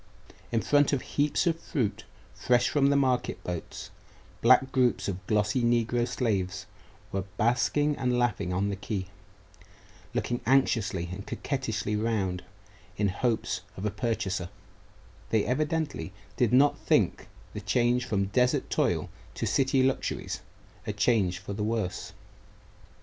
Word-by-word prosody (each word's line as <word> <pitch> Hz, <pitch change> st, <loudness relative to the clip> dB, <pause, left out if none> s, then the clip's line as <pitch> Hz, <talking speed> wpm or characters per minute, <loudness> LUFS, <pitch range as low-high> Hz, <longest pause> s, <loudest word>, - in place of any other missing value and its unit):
In 115 Hz, -2 st, +1 dB
front 145 Hz, 0 st, +3 dB
of 135 Hz, -, 0 dB
heaps 145 Hz, +1 st, 0 dB
of 165 Hz, -1 st, +1 dB
fruit, 125 Hz, -12 st, -2 dB, 0.3 s
fresh 120 Hz, -1 st, +2 dB
from 140 Hz, -2 st, +3 dB
the 140 Hz, -, +3 dB
market 130 Hz, -3 st, +1 dB
boats, 90 Hz, -2 st, -6 dB, 0.5 s
black 130 Hz, +2 st, +5 dB
groups 125 Hz, -2 st, +2 dB
of 95 Hz, -1 st, -5 dB
glossy 105 Hz, +3 st, +2 dB
negro 120 Hz, 0 st, +2 dB
slaves 100 Hz, -6 st, -1 dB, 0.5 s
were 95 Hz, -, -1 dB, 0.2 s
basking 145 Hz, +6 st, +2 dB
and 125 Hz, -1 st, +1 dB
laughing 120 Hz, -7 st, 0 dB
on 95 Hz, +3 st, 0 dB
the 100 Hz, -, -2 dB
quay, 100 Hz, -1 st, -4 dB, 1.1 s
looking 120 Hz, 0 st, -1 dB
anxiously 110 Hz, -9 st, +2 dB
and 100 Hz, +2 st, -7 dB
coquettishly 110 Hz, -6 st, -2 dB
round 105 Hz, -5 st, -1 dB, 0.5 s
in 105 Hz, -1 st, +2 dB
hopes 115 Hz, +4 st, -1 dB, 0.2 s
of 95 Hz, -, -4 dB
a 105 Hz, -, 0 dB
purchaser; 100 Hz, -5 st, -2 dB, 0.8 s
they 110 Hz, -2 st, +2 dB
evidently 150 Hz, -3 st, -1 dB, 0.2 s
did 120 Hz, -2 st, +2 dB
not 140 Hz, +3 st, +4 dB
think -, -, +1 dB, 0.3 s
the -, -, -5 dB
change 125 Hz, 0 st, +2 dB
from 100 Hz, -4 st, 0 dB
desert 125 Hz, +6 st, +1 dB
toil -, -, +1 dB, 0.3 s
to -, -, -2 dB
city 135 Hz, -1 st, +2 dB
luxuries 130 Hz, 0 st, -1 dB, 0.5 s
a 105 Hz, -, -1 dB
change 105 Hz, -4 st, +2 dB
for 95 Hz, +2 st, -7 dB
the 105 Hz, +1 st, -3 dB
worse. 110 Hz, -4 st, -2 dB
115 Hz, 135 wpm, -28 LUFS, 100-130 Hz, 1.1 s, black